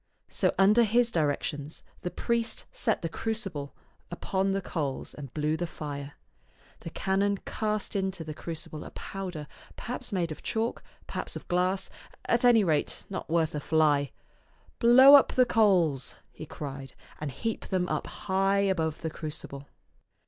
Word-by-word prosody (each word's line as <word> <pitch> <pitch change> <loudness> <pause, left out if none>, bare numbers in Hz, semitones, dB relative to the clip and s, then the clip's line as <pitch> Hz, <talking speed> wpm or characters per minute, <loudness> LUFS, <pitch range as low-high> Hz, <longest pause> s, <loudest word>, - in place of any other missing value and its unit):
So - - +1
under 205 +4 +6
his 235 +2 +3
directions 145 -2 -2 0.2
the 180 - -2
priest 230 +3 -1
set - - 0
the - - 0
crucible 180 -7 -4 0.3
upon 190 +2 -1
the 195 0 +1
coals 150 -7 -3
and 140 -4 -9
blew 150 0 +1
the 175 +2 -2
fire. 145 -3 -6 0.7
The - - -7
canon 200 +3 0
cast 215 -2 -2
into 190 -3 -1
the 155 -1 -6
crucible 155 -1 -7
a - - -8
powder, 180 -6 -6 0.3
perhaps 245 0 -5
made 175 -4 -1
of 155 - -7
chalk, 225 +1 -2 0.2
perhaps - - -5
of - - -8
glass, 185 +2 0 0.3
at 235 +1 +2
any 240 -3 +6
rate 155 -5 0
not 190 - -5
worth 165 -1 +1
a 150 - -2
fly. 145 -2 +2 0.3
" - - -33
Blow 260 +4 +8
up 285 - +7
the 255 - +5
coals," 180 - +2 0.2
he 155 - -9
cried, 135 -3 -7
" - - -22
and 150 - -2
heap 225 - -4
them 185 -2 0
up - - -2
high 195 +1 0
above 165 -6 0
the 160 - -3
crucible." 145 -3 -6
180 Hz, 160 wpm, -28 LUFS, 150-205 Hz, 0.7 s, Blow